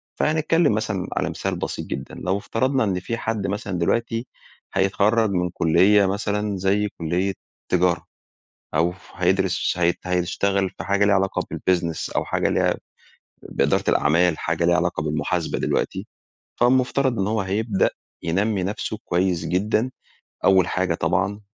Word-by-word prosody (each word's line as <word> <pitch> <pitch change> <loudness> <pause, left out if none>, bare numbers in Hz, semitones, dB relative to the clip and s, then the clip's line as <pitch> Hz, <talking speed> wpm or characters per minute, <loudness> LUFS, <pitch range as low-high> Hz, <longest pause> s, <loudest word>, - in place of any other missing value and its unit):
فهنتكلم 155 -2 +2
مثلًا 105 -4 -2
على - - -1
مثال - - -3
بسيط - - -4
جدًا - - -6
لو 95 +2 -1
افترضنا 130 +5 0
إن 95 -3 0
في 115 +6 -4
حد 110 -4 -2
مثلًا 100 -2 -3
دلوقتي 115 +6 0 0.5
هيتخرج 100 +3 +2
من 90 -1 0
كلية 95 +5 +4
مثلًا 100 +1 -1
زي 100 +2 +1
كلية 90 +4 0 0.4
تجارة، 90 -1 +2 0.7
أو 85 +3 +2 0.2
هيدرس 95 +1 +1
هي 85 0 +3
هيشتغل 95 +2 0
في - - -9
حاجة 100 +1 +2
لها 100 -1 +4
علاقة 95 0 +1
بالbusiness 85 -3 -1
أو - - +1
حاجة - - 0
ليها - - +2 0.7
بإدارة - - 0
الأعمال 80 +2 +3
حاجة 80 +1 -1
ليها 85 +1 +4
علاقة 90 -3 0
بالمحاسبة 75 0 -1
دلوقتي، - - -1 0.5
فالمفترض 130 0 +2
إن 95 - +1
هو 110 0 0
هيبدأ 100 +2 +1 0.3
ينمّي 95 +3 0
نفسه 105 +2 -3
كويّس 90 -1 0
جدًا. 105 +6 0 0.6
أوّل 95 -2 +5
حاجة 90 -2 0
طبعًا 95 +6 0
95 Hz, 140 wpm, -23 LUFS, 90-105 Hz, 0.7 s, أوّل